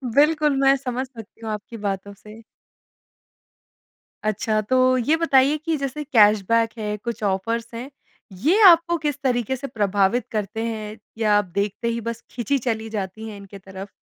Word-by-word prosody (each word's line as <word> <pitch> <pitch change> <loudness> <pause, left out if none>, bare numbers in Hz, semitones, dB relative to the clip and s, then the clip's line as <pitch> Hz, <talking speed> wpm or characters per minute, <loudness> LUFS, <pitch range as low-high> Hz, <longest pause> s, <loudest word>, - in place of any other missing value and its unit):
बिल्कुल, 300 -1 +4
मैं 270 0 +5
समझ 260 0 -3
सकती 225 -3 -13
हूँ 220 - -3
आपकी 215 +2 -6
बातों 200 0 -3
से। 215 +3 -14 1.8
अच्छा, 215 +1 0
तो 255 +3 +3
ये 290 +7 +2
बताइए 285 -2 +3
कि 315 0 -2
जैसे 275 +2 -4
कैशबैक 225 -2 +4
है, 210 -1 -3
कुछ 235 +1 -6
ऑफ़र्स 225 +4 -1
हैं, 245 +4 -6 0.4
ये 310 - +2
आपको 340 0 +5
किस 295 -3 -3
तरीके 250 -1 0
से 275 +2 -6
प्रभावित 205 +1 +1
करते 215 +1 -3
हैं, 215 -1 -5 0.2
या 210 -2 +3
आप 205 - +1
देखते 200 +5 -2
ही 230 0 -1
बस 230 +1 -5
खींची 245 +3 -1
चली 225 -3 -3
जाती 215 +1 -5
हैं 205 - -9
इनके 200 0 -11
तरफ़? 190 +1 -9
230 Hz, 165 wpm, -23 LUFS, 210-265 Hz, 1.8 s, मैं